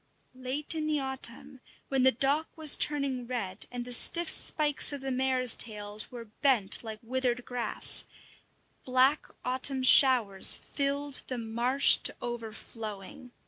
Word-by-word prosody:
Late 260 +4 -3
in 310 -1 -4
the 305 -1 -1
autumn, 265 0 -2 0.3
when 270 -1 0
the 260 +1 +4
dock 275 +6 0
was 310 -2 +4
turning 275 -4 -1
red, 230 -7 -6
and 245 -1 -7
the 245 - -5
stiff 340 +7 +4
spikes 300 -2 +3
of 285 -2 -7
the 270 0 -5
mare's 255 -1 +3
tails 210 -1 -3
were 240 -2 -10
bent 220 -2 -1
like 220 -1 -8
withered 250 0 -3
grass, 245 -3 -3 0.8
black 260 +3 +1 0.2
autumn 260 +1 -2
showers 250 -7 +6
filled 280 0 -4
the 255 - -6
marsh 235 +4 +3
to - - -2
overflowing. 230 +1 -9
255 Hz, 140 wpm, -28 LUFS, 235-275 Hz, 0.8 s, showers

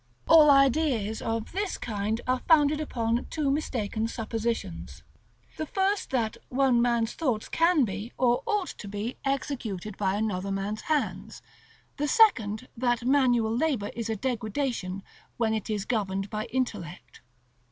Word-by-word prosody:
All 315 -2 +8
ideas 275 -6 +3
of 225 -1 -3
this 395 +1 -2
kind 215 0 -2
are 255 0 +1
founded 300 -2 +4
upon 235 -5 -1
two 295 -3 0
mistaken 225 -6 -1
suppositions: 225 -5 -4 0.5
the 310 - -3
first, 390 +3 0
that 230 -4 -1
one 255 -2 +3
man's 235 -1 +1
thoughts 250 -9 -1
can 330 -4 +3
be, 205 +3 -5
or 245 -1 +2
ought 415 -4 0
to 205 - -7
be, 205 +4 -4
executed 230 -8 -3
by 195 -1 0
another 200 -3 -2
man's 200 +2 -3
hands; 305 -2 -2 0.5
the 295 0 0
second, 255 - +3
that 240 -1 0
manual 245 -4 +3
labor 255 -7 0
is 230 -1 -4
a 220 - 0
degradation, 220 -4 -2 0.3
when 225 -2 +1
it 220 -1 -3
is 210 -2 -2
governed 195 -3 -2
by 215 0 -3
intellect. 210 -11 -4
235 Hz, 140 wpm, -27 LUFS, 215-275 Hz, 0.5 s, All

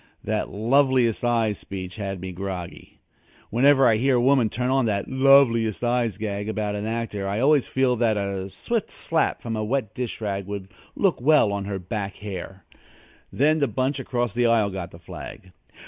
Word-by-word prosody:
That - - -2
"loveliest 125 +2 +2
eyes" 115 -4 +1
speech 95 0 -7
had 100 -3 -4
me 95 0 -5
groggy. 90 -1 -7 0.5
Whenever 135 +4 +5
I 110 -3 +4
hear 130 +3 +2
a - - +3
woman 125 -2 +3
turn 125 +4 -2
on 135 -3 +2
that 100 -2 -1
"loveliest 130 -5 +4
eyes" 120 -4 0
gag 105 -1 -3
about 105 -1 -2
an 105 +1 -3
actor 110 -3 -3
I 100 +2 -1
always 140 +1 +3
feel 130 -1 +1
that 110 -2 +2
a 100 -1 -3
swift 230 - -3
slap 165 -1 -1
from 115 -1 -3
a 110 - -2
wet 115 -2 -2
dish 125 -2 -4
rag 100 -3 -3
would 100 -2 -6 0.3
look 185 -10 +1
well 135 -7 +4
on 100 -1 -3
her 100 -1 -3
back 100 +2 -5
hair. 95 -2 -8 0.7
Then 155 +4 +2
the 140 - +2
bunch 130 +2 -1
across 120 -4 -2
the 120 +1 +2
aisle 110 -3 +2
got 95 -2 -5
the 85 - -13
flag. 90 +1 -10
110 Hz, 185 wpm, -24 LUFS, 100-130 Hz, 0.7 s, Whenever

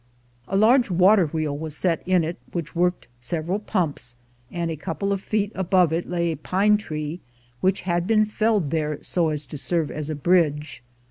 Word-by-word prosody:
A 195 - 0
large 235 +4 +5
water 185 +1 +5
wheel 155 -1 -2
was 155 0 -6
set 170 -3 0
in 185 -2 +3
it, 165 +3 -4
which 170 -3 -4
worked 180 +1 0
several 165 +9 -2
pumps, 160 - -2 0.4
and 170 -1 -2
a - - -3
couple 165 +5 -2
of 195 - -3
feet 205 0 -1
above 180 -3 +2
it 170 +1 -2
lay 170 -1 0
a 160 - -4
pine 195 +7 +2
tree, 155 -4 -5 0.4
which 190 +1 +1
had 175 -1 -1
been 215 -1 +4
felled 210 -7 0
there 150 -2 -1
so 170 -3 +1
as 150 -1 -3
to 150 - -8
serve 165 0 -1
as 155 0 -5
a 155 - -2
bridge. 150 -2 +1
170 Hz, 190 wpm, -24 LUFS, 155-190 Hz, 0.4 s, large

